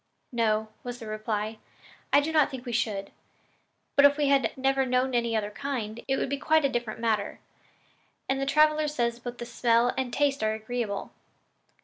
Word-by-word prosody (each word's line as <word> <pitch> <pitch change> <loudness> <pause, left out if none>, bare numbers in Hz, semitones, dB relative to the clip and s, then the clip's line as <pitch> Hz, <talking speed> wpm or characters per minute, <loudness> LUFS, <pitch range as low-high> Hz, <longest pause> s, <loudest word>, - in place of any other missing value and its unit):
"No," 220 -2 +1
was 245 0 -5
the 230 - -9
reply, 215 0 -3 0.5
"I 285 - +6
do 310 +3 -2
not 305 -2 +4
think 260 -3 -8
we 245 - -4
should; 210 -4 -1 0.8
but 280 - +6
if 285 0 +6
we 290 -2 +2
had 275 -4 +3
never 270 0 +2
known 255 0 +1
any 235 -1 +1
other 210 -1 -1
kind, 235 -3 -4
it 270 0 +1
would - - -1
be 280 +1 -2
quite 315 +1 +3
a - - +3
different 240 -3 -3
matter, 225 -2 -1 0.9
and 270 0 0
the 275 - -1
traveler 305 +1 +4
says 240 -5 -1
that 245 0 -7
both 240 - -6
smell 235 0 +2
and 260 -2 -2
taste 280 -1 +1
are 215 0 +1
agreeable. 220 -2 -4
245 Hz, 190 wpm, -27 LUFS, 225-275 Hz, 0.9 s, I